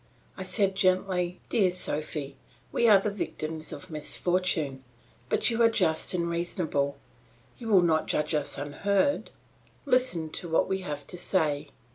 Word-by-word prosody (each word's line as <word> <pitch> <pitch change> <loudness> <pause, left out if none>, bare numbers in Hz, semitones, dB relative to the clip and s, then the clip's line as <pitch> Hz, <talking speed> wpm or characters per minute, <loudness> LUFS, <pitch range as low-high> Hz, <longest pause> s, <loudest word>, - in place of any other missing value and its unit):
I - - -8
said 195 -3 +1
gently, 185 -2 +1
"Dear 195 -5 +3
Sophy, 150 -5 -3 0.4
we 235 - +3
are 205 -3 +8
the 205 +1 -1
victims 160 -5 -4
of 185 - -8
misfortune; 155 -3 -1 0.5
but - - +2
you 230 0 0
are 230 - +7
just 180 -5 +1
and 170 -1 0
reasonable; 170 -5 -1 0.6
you 235 - -7
will 195 -5 +5
not 160 -2 +2
judge 150 +1 0
us 150 -2 -1
unheard; 200 - 0 0.6
listen 250 - +1
to 170 - -2
what 160 - +2
we 190 0 -1
have 150 -6 -5
to 180 - -8
say." 150 -6 0
175 Hz, 150 wpm, -28 LUFS, 155-195 Hz, 0.6 s, are